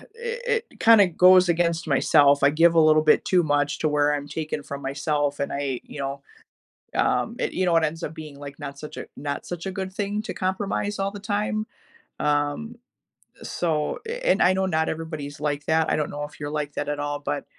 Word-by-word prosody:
It 475 0 -2
it - - -20
kinda 225 -4 +7
goes 180 +1 +6
against 170 -1 +1
myself, 140 0 +4
I 140 - +7
give 165 +3 +4
a - - +6
little 155 -1 +5
bit 155 0 +3
too 180 -2 +3
much 145 -1 0
to 155 - +1
where 150 0 +2
I'm 145 -1 -3
taking 155 -1 -4
from 140 0 -7
myself, 145 +1 -1
and 140 - -2
I, 140 -3 -2
you - - -10
know, 140 0 -4 0.7
um, - - +1
it - - -1
you 185 - 0
know, 175 -2 +2
it 165 - +2
ends 160 +2 -2
up 155 - -4
being, 155 -3 -9
like, 140 0 -9
not 140 -1 -7
such 150 - -9
a - - -5
not 140 0 -4
such 175 0 -6
a 190 - -2
good 190 0 -4
thing 205 +1 -2
to 215 - -5
compromise 195 +2 -2
all 195 0 0
the 205 - -8
time. 210 +1 -1 0.5
Um, 145 +10 -1 0.7
so, 155 -4 -2
eh, 475 +2 -4
and - - +3
I 180 - +5
know 190 0 0
not 160 -3 0
everybody's 155 -3 -5
like 145 -1 -2
that, 160 0 +2
I - - +2
don't 150 -1 -2
know 145 0 -4
if 150 +1 -11
you're 145 0 -4
like 150 -1 -3
that 145 - -3
at 145 0 -2
all, 145 0 -2
but, 145 0 -3
155 Hz, 220 wpm, -24 LUFS, 145-185 Hz, 0.7 s, kinda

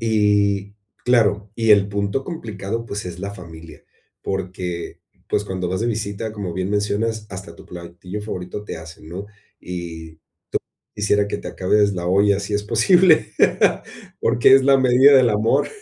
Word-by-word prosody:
Y 105 -2 +1 0.3
claro 105 -4 +2
y 115 -1 +1
el 100 -1 +4
punto 100 +6 -2
complicado, 115 - -5
pues, 100 -2 -5
es 90 -1 -7
la 100 +1 -4
familia, 85 -3 -12 0.4
porque, 90 -2 -5 0.3
pues, 105 - 0
cuando 95 -3 -3
vas 95 +2 -2
de 115 - 0
visita, 105 -1 -3
como 100 -5 -5
bien 95 +1 -2
mencionas, 105 +2 -1
hasta 95 -3 -8
tu - - -14
platillo 90 +3 -8
favorito 100 0 -6
te - - -6
hacen, 80 -1 -12
¿no?, 95 +5 -7 0.3
y 85 -2 -7
te - - -41 0.8
quisiera 105 0 +1
que - - -3
te - - -8
acabes 100 +2 +2
la 90 -2 -4
olla 100 +2 +3
si 100 +1 -5
es 105 - -2
posible, 155 - +4 0.9
porque 120 +3 +5
es 135 - +4
la 135 0 +5
medida 130 +2 +6
del 125 -2 +4
amor. 105 +1 +2
100 Hz, 165 wpm, -21 LUFS, 90-110 Hz, 0.9 s, medida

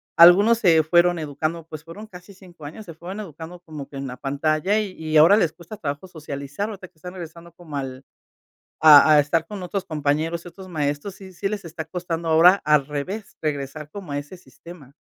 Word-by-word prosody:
Algunos 195 +7 +7
se 165 -6 +4
fueron 175 +2 +3
educando, 155 +2 -4
pues 155 -1 -9
fueron 195 +7 -10
casi 180 0 -13
5 180 -4 -17
años, 160 +9 -9
se 165 - -9
fueron 180 +6 -8
educando 170 -2 -9
como 155 -5 -10
que 140 - -9
en 135 - -5
la 125 - -7
pantalla 155 +9 0
y 205 -3 -3
y 155 -2 -1
ahora 165 +7 +7
les 175 -7 +2
cuesta 170 +6 -11
trabajo 145 +1 -5
socializar. 150 +3 -6
O 210 - -7
sea 185 -1 -11
que - - -37
están 180 +3 -9
regresando 170 -1 -10
como 165 -5 -11
al 135 -1 -6 0.8
a 155 0 +8
a 150 - +7
estar 160 +3 0
con 205 -1 -7
otros 190 +2 -3
compañeros, 155 +2 -1
otros 185 +2 -11
maestros, 145 +3 -3
sí 190 -1 -13
sí 195 +3 -3
les 205 -2 -5
está 160 -1 -7
costando 170 -2 -4
ahora 170 +4 +6
al 150 -2 +3
revés, 185 +9 -6
regresar 150 0 -4
como 185 -5 -8
a 145 - -1
ese 145 +6 -9
sistema. 140 -1 -15
165 Hz, 205 wpm, -23 LUFS, 150-185 Hz, 0.8 s, a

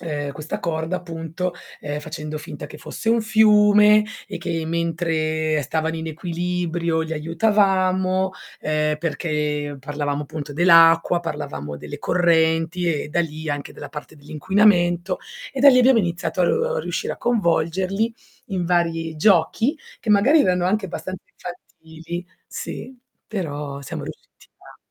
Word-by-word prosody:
ehm, 145 -3 -4
questa 155 +2 -5
corda 165 +2 -2
appunto, 170 0 -4 0.3
ehm, 145 0 -4
facendo 150 +1 -6
finta 150 -1 -8
che - - -11
fosse 225 - -6
un 230 0 +4
fiume, 210 -1 +6 0.2
e 200 - -6
che 165 -1 -3
mentre 160 -2 0
stavano 160 +4 -1
in 160 0 -4
equilibrio 170 0 -2
li 160 0 -5
aiutavamo, 185 +2 +2 0.3
ehm, 155 0 0
perché 150 -3 -2
parlavamo 145 +1 -3
appunto 145 0 -7
dell'acqua, 165 +1 +5
parlavamo 75 - -5
delle 145 - -8
correnti 165 0 +2
e - - -8
da 170 +3 +1
lì 155 -1 -4
anche 145 -1 -3
della 145 -1 -9
parte 150 +1 -9
dell'inquinamento. 175 +3 +2 0.3
E 270 - -4
da 285 - +9
lì 255 -2 +7
abbiamo 255 -1 +6
iniziato 170 -1 -2
a 485 - +1
riuscire - - -3
a - - -8
coinvolgerli 190 0 0 0.3
in 190 -6 -2
vari 165 -2 0
giochi, 210 - +2 0.2
che 225 - -2
magari 255 +10 +5
erano 180 -4 +2
anche 195 +2 +1
abbastanza 185 +1 -6
infantili 170 0 -9 0.3
sì, 265 - -6 0.3
però 145 -8 -4
siamo 140 - -6
riusciti - - -11
a - - -16
170 Hz, 135 wpm, -22 LUFS, 155-185 Hz, 0.3 s, da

